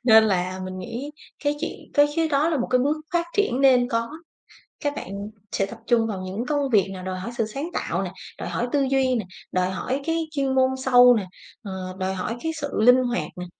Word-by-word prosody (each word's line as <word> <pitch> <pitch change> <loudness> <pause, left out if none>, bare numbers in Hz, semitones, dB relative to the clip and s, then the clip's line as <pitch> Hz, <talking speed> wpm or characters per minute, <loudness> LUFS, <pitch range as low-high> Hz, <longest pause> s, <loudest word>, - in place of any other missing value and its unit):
Nên 220 -2 +8
là 185 -2 0
mình 185 0 -6
nghĩ 235 +10 -5 0.3
cái 290 0 +1
chuyện - - -4 0.2
cái 290 -1 +6
chứ 325 -1 +2
có 290 +3 +3
là 320 - +1
một 245 - 0
cái 255 - +4
bước 285 +5 +1 0.2
phát 340 0 +1
triển 275 - +2
nên 255 -3 +5
có. 230 0 0 0.7
Các 290 -1 -1
bạn 200 +2 -6 0.2
sẽ 195 - +1
tập 230 +3 -10
trung 230 -2 +3
vào 195 -4 -4
những 190 +6 -4
công 285 -1 0
việc 205 -4 +4
nào 185 - -7
đòi 185 0 -4
hỏi 230 +6 -5
sự 225 - +1
sáng 275 +10 -5
tạo - - -1
nè, - - -4 0.3
đòi - - -5
hỏi 240 - -1
tư 285 - +2
duy 265 -1 +2
nè, 220 -5 -2 0.3
đòi 185 0 +1
hỏi 255 +8 -2
cái 325 -1 0
chuyên 275 -3 0
môn 260 0 +4 0.2
sâu 245 -1 +8
nè, 210 -4 -1 0.4
ờ, 200 - -6 0.3
đòi 190 0 -1
hỏi 200 +5 -3
cái 320 - 0
sự 285 - -2
linh 250 +3 +6
hoạt 245 -1 -1
nè, 180 - -5
245 Hz, 235 wpm, -24 LUFS, 200-275 Hz, 0.7 s, Nên